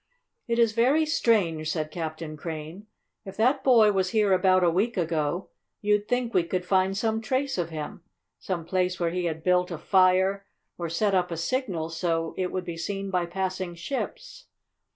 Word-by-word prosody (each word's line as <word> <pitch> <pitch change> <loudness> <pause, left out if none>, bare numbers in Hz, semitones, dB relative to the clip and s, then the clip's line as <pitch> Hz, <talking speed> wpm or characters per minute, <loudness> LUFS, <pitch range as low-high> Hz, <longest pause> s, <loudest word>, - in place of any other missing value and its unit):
"It 235 -1 0
is 230 -2 +4
very 260 +8 +3
strange," 190 - +1
said 155 -2 -3
Captain 160 -2 -5
Crane. 160 +5 -7 0.4
"If 195 -2 -10
that 260 +5 +2
boy 230 -6 +6
was 190 -2 0
here 210 -1 +3
about 185 0 +4
a 175 - +5
week 210 +7 0
ago, 165 0 -1 0.3
you'd 210 0 +1
think 245 -1 -1
we 180 - +3
could 180 +1 -3
find 190 +1 +2
some 220 +1 0
trace 265 +4 -1
of 170 -1 -1
him 155 +1 -6 0.4
some 175 -4 -4
place 180 0 0
where 170 -1 0
he 180 0 -2
had 160 -1 -3
built 180 0 +2
a 170 - -4
fire, 190 +3 +3 0.3
or 170 -1 -4
set 200 +5 +1
up 180 -1 +2
a 170 - -4
signal 170 -5 -2
so 165 -1 -1
it 185 -1 -2
would 185 -1 -3
be 170 -1 -5
seen 195 +3 -4
by 180 -2 0
passing 185 0 -3
ships. 390 - -6
185 Hz, 185 wpm, -26 LUFS, 170-215 Hz, 0.4 s, boy